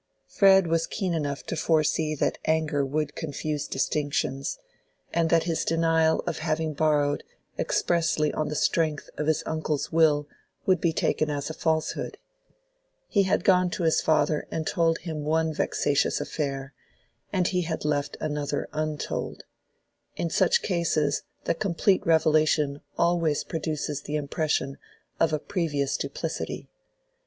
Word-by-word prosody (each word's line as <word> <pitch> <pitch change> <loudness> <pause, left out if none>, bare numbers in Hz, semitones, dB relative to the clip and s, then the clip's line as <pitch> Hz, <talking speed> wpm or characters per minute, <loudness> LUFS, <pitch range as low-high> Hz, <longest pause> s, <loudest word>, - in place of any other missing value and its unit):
Fred 195 -2 +5
was 165 0 +1
keen 190 -4 -2
enough 145 -3 -2
to - - -4
foresee 155 -1 +1
that - - 0
anger 155 -2 +1
would 145 +1 -1
confuse 150 -1 -3
distinctions, 140 -1 -1 0.6
and 165 -1 +2
that 165 -1 +4
his 165 -2 -1
denial 165 -1 +2
of 175 - -2
having 160 -1 -1
borrowed 145 -1 +1 0.4
expressly 160 -3 +1
on 155 - -1
the 150 - -3
strength 155 -1 0
of 150 - -1
his 155 -1 +2
uncle's 155 -2 -2
will 150 -3 +3 0.4
would 185 -3 +3
be 170 - +3
taken 155 -1 0
as 145 +1 -2
a - - -6
falsehood. 160 -1 -1 0.9
He 200 -3 +3
had - - +2
gone 180 -2 +4
to 180 0 -3
his 160 -1 +3
father 150 -1 +2
and 160 - -3
told 165 -2 +2
him 160 -3 -5
one 160 +1 +1
vexatious 145 -1 +1
affair, 140 -2 -3 0.6
and 185 -3 +1
he 180 -1 +1
had 160 -3 -3
left 145 -1 -1
another 150 -2 -2
untold: 155 -1 -3 0.7
in 170 - -2
such 185 +1 +3
cases 165 -6 +1 0.2
the - - +1
complete 190 +1 +1
revelation 155 -3 +3 0.2
always 170 -3 +2
produces 155 -2 -3
the 145 - -4
impression 145 -1 -1 0.4
of 165 - +3
a 155 - +2
previous 150 -5 -1
duplicity. - - -4
155 Hz, 140 wpm, -26 LUFS, 150-165 Hz, 0.9 s, Fred